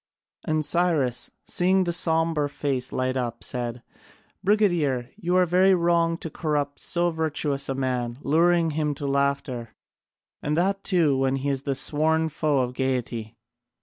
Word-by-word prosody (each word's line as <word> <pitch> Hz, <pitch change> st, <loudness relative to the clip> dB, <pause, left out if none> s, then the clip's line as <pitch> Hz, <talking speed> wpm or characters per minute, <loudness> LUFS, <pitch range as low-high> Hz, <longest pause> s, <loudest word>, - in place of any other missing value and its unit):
And 155 Hz, -1 st, 0 dB
Cyrus, 155 Hz, -7 st, +1 dB, 0.2 s
seeing 185 Hz, +1 st, +2 dB
the 175 Hz, -1 st, -1 dB
sombre 165 Hz, -3 st, +2 dB
face 140 Hz, -3 st, -3 dB
light 130 Hz, 0 st, -1 dB
up 120 Hz, -2 st, -3 dB
said: 120 Hz, -1 st, -4 dB, 0.6 s
"Brigadier, 175 Hz, -, +1 dB
you 180 Hz, -3 st, -1 dB
are 185 Hz, 0 st, +5 dB
very 185 Hz, +2 st, +4 dB
wrong 170 Hz, -1 st, +2 dB
to 165 Hz, -, -7 dB
corrupt 145 Hz, -3 st, -2 dB
so 175 Hz, 0 st, 0 dB
virtuous 150 Hz, -3 st, -1 dB
a 135 Hz, -, -1 dB
man, 125 Hz, -2 st, -2 dB
luring 165 Hz, +2 st, +3 dB
him 150 Hz, -1 st, -1 dB
to 145 Hz, -, -6 dB
laughter, 140 Hz, -4 st, -1 dB, 0.7 s
and 150 Hz, +1 st, -1 dB
that 195 Hz, +3 st, 0 dB
too 160 Hz, -8 st, +2 dB
when 135 Hz, 0 st, +1 dB
he 135 Hz, +1 st, -2 dB
is 135 Hz, -1 st, -1 dB
the 140 Hz, -1 st, -2 dB
sworn 160 Hz, +3 st, +2 dB
foe 150 Hz, -2 st, 0 dB
of 125 Hz, 0 st, -2 dB
gaiety." 120 Hz, -4 st, -3 dB
150 Hz, 150 wpm, -25 LUFS, 130-170 Hz, 0.7 s, are